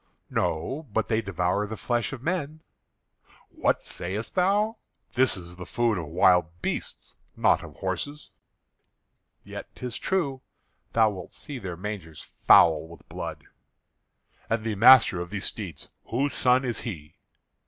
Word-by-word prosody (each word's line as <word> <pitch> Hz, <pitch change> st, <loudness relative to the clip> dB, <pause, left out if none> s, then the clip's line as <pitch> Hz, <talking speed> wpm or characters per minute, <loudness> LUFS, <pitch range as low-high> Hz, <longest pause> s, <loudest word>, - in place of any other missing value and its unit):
"No, 130 Hz, -, -1 dB
but 110 Hz, 0 st, 0 dB
they 110 Hz, 0 st, +2 dB
devour 95 Hz, 0 st, 0 dB
the 110 Hz, +1 st, -6 dB
flesh 120 Hz, -2 st, -1 dB
of 130 Hz, -2 st, -7 dB
men." 160 Hz, -2 st, -2 dB, 0.9 s
"What -, -, 0 dB
sayest 100 Hz, +6 st, -5 dB
thou? 205 Hz, +4 st, +2 dB, 0.4 s
This 130 Hz, -4 st, +3 dB
is 90 Hz, -1 st, -10 dB
the 90 Hz, -, -7 dB
food 115 Hz, -5 st, +1 dB
of 80 Hz, -, -5 dB
wild 85 Hz, 0 st, +3 dB
beasts, -, -, -4 dB, 0.2 s
not -, -, +4 dB
of -, -, -11 dB
horses." 145 Hz, +1 st, -4 dB, 1.1 s
"Yet -, -, -8 dB
'tis 125 Hz, -2 st, -5 dB
true. 140 Hz, -9 st, -1 dB, 0.5 s
Thou 110 Hz, -2 st, +4 dB
wilt 95 Hz, -3 st, -9 dB
see 140 Hz, -3 st, -7 dB
their 90 Hz, -5 st, -6 dB
mangers 95 Hz, -5 st, -6 dB
foul 80 Hz, -1 st, +5 dB
with 85 Hz, -2 st, -15 dB
blood." -, -, -6 dB, 1.1 s
"And 115 Hz, -1 st, 0 dB
the 110 Hz, -1 st, -1 dB
master 115 Hz, -3 st, +7 dB
of 90 Hz, -, -6 dB
these 100 Hz, -2 st, -4 dB
steeds, 90 Hz, -10 st, -5 dB, 0.2 s
whose 135 Hz, +5 st, -1 dB
son 130 Hz, +1 st, +3 dB
is 120 Hz, -3 st, -2 dB
he?" 80 Hz, -10 st, -7 dB
110 Hz, 145 wpm, -26 LUFS, 90-130 Hz, 1.1 s, master